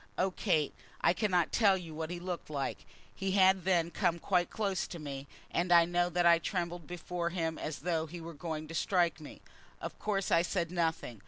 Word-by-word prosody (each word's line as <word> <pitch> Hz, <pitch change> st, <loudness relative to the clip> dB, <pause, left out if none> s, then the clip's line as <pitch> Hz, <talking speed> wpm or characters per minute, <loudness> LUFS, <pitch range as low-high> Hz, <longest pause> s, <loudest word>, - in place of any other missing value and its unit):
Oh, 190 Hz, +1 st, +2 dB
Kate, 160 Hz, -6 st, +1 dB, 0.3 s
I -, -, +4 dB
cannot 185 Hz, -4 st, +1 dB
tell 200 Hz, -4 st, +4 dB
you 170 Hz, -3 st, -8 dB
what 160 Hz, 0 st, -4 dB
he 175 Hz, 0 st, -4 dB
looked 175 Hz, -2 st, -5 dB
like. 140 Hz, -3 st, -3 dB, 0.3 s
He 195 Hz, -1 st, -2 dB
had 190 Hz, -2 st, +5 dB
then 170 Hz, -3 st, +2 dB
come 175 Hz, -1 st, +1 dB
quite 175 Hz, +1 st, +1 dB
close 200 Hz, -3 st, -1 dB
to 175 Hz, -, -7 dB
me, 140 Hz, -3 st, -6 dB, 0.2 s
and 175 Hz, +1 st, 0 dB
I 170 Hz, -1 st, +8 dB
know 175 Hz, +1 st, +1 dB
that 175 Hz, 0 st, +1 dB
I 170 Hz, -1 st, +7 dB
trembled 175 Hz, -2 st, -3 dB
before 175 Hz, 0 st, -3 dB
him 165 Hz, -2 st, -2 dB
as 155 Hz, -2 st, -4 dB
though 165 Hz, -1 st, 0 dB
he 170 Hz, +3 st, -8 dB
were 165 Hz, 0 st, -8 dB
going 155 Hz, 0 st, -5 dB
to -, -, -7 dB
strike 170 Hz, -2 st, +1 dB
me. 150 Hz, -, -11 dB, 0.4 s
Of -, -, -7 dB
course 200 Hz, -2 st, -1 dB
I 170 Hz, -, +6 dB
said 175 Hz, -1 st, -1 dB
nothing. 160 Hz, -, -1 dB
175 Hz, 210 wpm, -32 LUFS, 160-180 Hz, 0.4 s, I